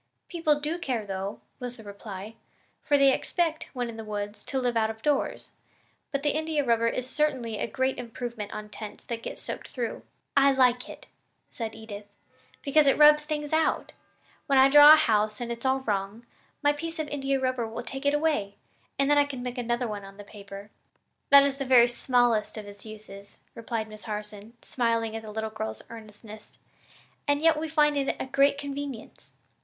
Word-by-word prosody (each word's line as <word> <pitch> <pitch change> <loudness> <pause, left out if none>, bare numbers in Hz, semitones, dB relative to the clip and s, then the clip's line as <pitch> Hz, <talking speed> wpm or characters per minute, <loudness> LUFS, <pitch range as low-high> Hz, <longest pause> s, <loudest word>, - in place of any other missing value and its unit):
"People 315 -4 +1
do 310 +4 -3
care, 250 -9 -2
though," 195 +1 -5 0.2
was 245 0 -6
the 225 - -12
reply, 200 0 -8 0.5
"for 290 - +2
they 275 -1 +5
expect, 325 0 -1
when 245 -2 -2
in 230 -1 -8
the 225 - -6
woods, 205 0 -5
to 270 - -3
live 245 -2 -1
out 220 -1 +2
of 220 0 -8
doors; 290 -2 -1 0.5
but 280 -1 -2
the 295 - +2
India 310 -1 0
rubber 230 -1 +2
is 250 +2 -2
certainly 260 -7 -1
a - - -1
great 260 +3 -1
improvement 235 -3 -6
on 215 0 -6
tents 210 0 -9
that 230 -1 -5
get - - -6
soaked - - -7
through." 240 -3 -4 0.3
"I 275 0 +5
like 250 -2 +2
it," - - -11 0.5
said 225 -2 -5
Edith, 210 -2 -9 0.6
"because 290 0 +4
it 275 - +4
rubs 300 0 +7
things 300 -1 -3
out. 320 0 +1 0.5
When 275 -2 +3
I 265 +1 +7
draw 295 +1 +10
a - - +11
house 215 -7 +1
and 240 -1 -4
it's 235 +2 -3
all 265 0 +1
wrong, 205 0 -3 0.4
my 290 0 +4
piece 325 +3 -6
of 315 -1 -3
India 275 -1 -1
rubber 255 -3 -1
will 225 +2 -6
take 270 +3 -7
it 285 - +3
away, 295 -11 0 0.4
and 275 - +2
then 290 0 +5
I 290 - +4
can 265 -3 -6
make 250 0 -4
another 240 +1 -1
one 205 -2 -5
on 195 0 -12
the 205 - -9
paper." 200 0 -11 0.6
"That 280 0 +9
is 280 0 -1
the - - -1
very 250 -2 +6
smallest 240 -3 +1
of 215 - -6
its 205 +1 -11
uses," 205 -2 -11 0.2
replied 230 -1 -4
Miss 215 -1 -12
Harson, 210 0 -6
smiling 230 -2 -1
at 225 - -4
the 220 - -10
little 220 +1 -4
girl's 220 0 -5
earnestness, 215 -1 -12 0.7
"and 285 0 +2
yet 320 0 +3
we 320 0 -3
find 300 -2 +3
it 275 -1 0
a - - -2
great 275 +2 +3
convenience. 280 -4 -7
245 Hz, 195 wpm, -27 LUFS, 215-285 Hz, 0.7 s, a